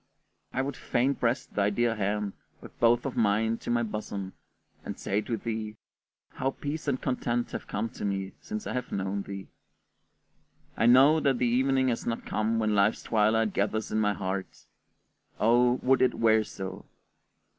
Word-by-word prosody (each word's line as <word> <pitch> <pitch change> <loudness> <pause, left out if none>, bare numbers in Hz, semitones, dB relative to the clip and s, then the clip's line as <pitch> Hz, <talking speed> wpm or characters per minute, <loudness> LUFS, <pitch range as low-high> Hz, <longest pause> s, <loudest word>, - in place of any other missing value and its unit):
I 130 - 0
would 140 -1 -3
fain 135 +1 +1
press 120 0 0
thy 100 0 0
dear 120 +2 +1
hand 105 0 -1 0.3
with - - -14
both 120 +2 +4
of 135 - -3
mine 110 +1 +2
to - - -7
my 120 0 +2
bosom, 105 -3 -5 0.5
and - - -6
say 100 +2 -1
to 115 +1 -3
thee, 110 0 -4 0.6
"How 130 - -1
peace 145 +3 -5
and 130 -2 +1
content 120 -2 -1
have - - -6
come 105 +3 -2
to - - -9
me 95 -1 -2
since 215 0 -5
I - - -3
have 125 -1 -3
known 95 +1 -2
thee!" 100 -1 -7 1.3
I 115 - +2
know 135 +6 +7
that 135 -4 +2
the 125 - +1
evening 130 +2 +2
has 115 - -2
not 115 -1 -2
come 110 +1 0
when 110 -1 +1
life's 100 +1 +2
twilight 110 -1 +2
gathers 110 +2 -1
in 110 - +1
my 105 -1 +2
heart: 95 +1 -5 0.7
oh, 120 +2 +4
would 130 +1 +4
it 130 - +3
were 110 -1 +4
so! 95 -2 -7
115 Hz, 175 wpm, -28 LUFS, 105-125 Hz, 1.3 s, know